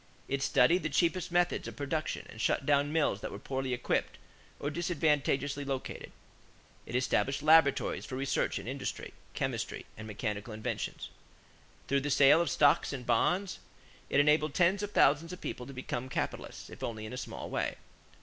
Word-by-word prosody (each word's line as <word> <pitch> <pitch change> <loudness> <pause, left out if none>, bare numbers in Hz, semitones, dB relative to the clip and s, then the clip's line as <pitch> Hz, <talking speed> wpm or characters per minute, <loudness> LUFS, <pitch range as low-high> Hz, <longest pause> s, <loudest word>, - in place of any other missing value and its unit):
It 140 0 -1
studied 165 +5 +4
the 155 - -2
cheapest 175 +3 +1
methods 175 0 +1
of - - -7
production 155 +2 -3
and 110 - -9
shut 135 - +1
down 145 0 +3
mills 150 -11 +1
that - - -4
were - - -6
poorly 130 +4 -3
equipped 125 0 -1 0.4
or 145 - -2
disadvantageously 145 -4 0
located. 135 -2 -5 0.8
It 120 - -5
established 135 +2 +1
laboratories 155 -2 +4
for 130 - -5
research 135 +1 0
in 100 +1 -7
industry, 135 +2 -4 0.2
chemistry, - - -3
and 110 0 -8
mechanical 105 0 -4
inventions. 110 - -4 0.8
Through 140 0 +2
the 145 - -2
sale 145 +3 +6
of 170 - 0
stocks 145 0 +3
and 125 -3 -6
bonds, 190 +1 +1 0.5
it - - +3
enabled 150 0 +3
tens 185 +3 +3
of 205 - -3
thousands 160 +3 +3
of 180 - -8
people 125 - -5
to - - -8
become 130 -1 -4
capitalists, - - -4
if - - -11
only 110 -2 -4
in 110 - -7
a - - -4
small 125 - -6
way. - - -1
140 Hz, 170 wpm, -31 LUFS, 130-160 Hz, 0.8 s, sale